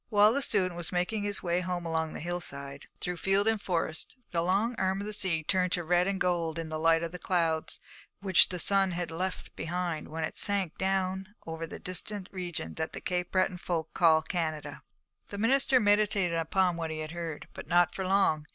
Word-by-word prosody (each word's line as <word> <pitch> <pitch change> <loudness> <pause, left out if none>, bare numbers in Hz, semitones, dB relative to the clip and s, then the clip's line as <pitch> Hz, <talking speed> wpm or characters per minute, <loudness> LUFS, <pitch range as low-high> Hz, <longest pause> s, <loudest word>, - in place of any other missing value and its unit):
While 210 0 +6
the 280 - +1
student 190 -8 +2
was 170 -1 -3
making 180 +4 0
his 205 -1 0
way 175 0 +1
home 180 -1 -3
along 160 -1 -1
the - - -6
hillside, 140 -5 -5
through 180 -1 -2
field 195 +4 +2
and 220 -2 +2
forest, 165 -4 -2 0.2
the 170 -2 +1
long 195 +7 +1
arm 190 0 +1
of 200 - -4
the 215 - -4
sea 180 -6 +1
turned 180 +1 +1
to 175 - 0
red 175 +2 +3
and 195 -1 -1
gold 170 -3 0
in 165 -1 -4
the 155 0 -3
light 165 +1 +4
of 165 - -3
the 180 - -7
clouds 165 -4 0 0.4
which 190 -3 +5
the 180 - -3
sun 195 +1 +3
had 170 -1 -3
left 180 +3 -4
behind 170 -2 -3
when 160 +1 -4
it - - -4
sank 195 -5 +1
down 190 +1 -1
over 165 0 -5
the - - -7
distant 185 +1 -5
region 175 - -5
that 160 - -3
the - - -4
Cape 180 -1 -2
Breton 185 -1 +1
folk 165 -3 -3
call 160 -3 +5
Canada. 155 -4 -3 0.5
The 200 - -7
minister 260 +4 +4
meditated 205 -4 +3
upon 175 +2 +1
what 165 -1 -3
he 160 - -4
had 155 0 -5
heard, 165 -3 -5
but - - -8
not 175 0 +4
for 190 - -3
long. 185 -5 +2
180 Hz, 210 wpm, -30 LUFS, 165-195 Hz, 0.5 s, While